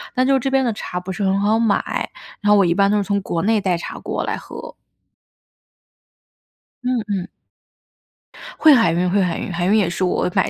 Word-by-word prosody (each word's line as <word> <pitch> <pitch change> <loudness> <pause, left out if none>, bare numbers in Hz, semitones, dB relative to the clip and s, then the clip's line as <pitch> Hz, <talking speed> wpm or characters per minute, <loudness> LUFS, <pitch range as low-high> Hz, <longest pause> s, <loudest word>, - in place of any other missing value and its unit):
但 255 0 +2
就 270 0 +3
这 270 - -2
边 270 0 +2
的 240 - +1
茶 180 -3 -5
不 180 +1 -7
是 195 +2 -4
很 195 0 +1
好 215 +2 +2
买， 225 -3 0 0.3
然 205 - -1
后 - - +7
我 195 - +4
一 170 - +2
般 200 +2 +3
都 210 - +2
是 205 - +1
从 200 +1 -1
国 170 -3 -3
内 220 +3 +2
带 185 -3 0
茶 170 - -7
过 - - -3
来 - - -2
喝。 - - -10 2.1
嗯， 250 -1 0
嗯。 195 -4 -3 1.3
会 310 -1 +7
海 230 -10 +4
运， 180 +2 0
会 200 +2 +2
海 180 -3 -1
运， - - -5
海 175 0 -2
运 195 - +2
也 195 -5 +2
是 180 - -3
我 180 - 0
买 - - +2
200 Hz, 230 characters per minute, -20 LUFS, 180-225 Hz, 2.1 s, 后